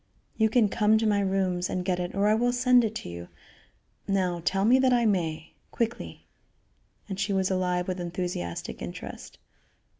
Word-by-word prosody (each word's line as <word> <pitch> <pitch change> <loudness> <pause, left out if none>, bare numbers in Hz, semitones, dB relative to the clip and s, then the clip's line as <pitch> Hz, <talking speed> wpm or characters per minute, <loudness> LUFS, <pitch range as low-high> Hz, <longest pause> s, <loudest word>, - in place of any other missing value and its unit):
You 220 -1 +2
can 220 -1 +4
come 215 +2 +3
to 225 - 0
my 205 -2 +2
rooms 190 -2 0
and 180 -1 -3
get 180 -2 0
it 175 +1 -4
or 200 +1 +2
I 210 - +4
will 240 +3 +2
send 250 0 +4
it 220 -1 -2
to 215 - -6
you. 85 0 -8 0.8
Now 185 -3 0
tell 195 +3 +1
me 250 +4 +5
that 260 -1 +3
I 240 -1 +3
may. 160 -6 -1 0.2
Quickly." 235 0 -4 0.8
And 195 -2 -5
she 200 +1 -1
was 190 0 +1
alive 180 -1 0
with 185 -1 -3
enthusiastic 175 - -4
interest. - - -8
195 Hz, 180 wpm, -27 LUFS, 180-220 Hz, 0.8 s, me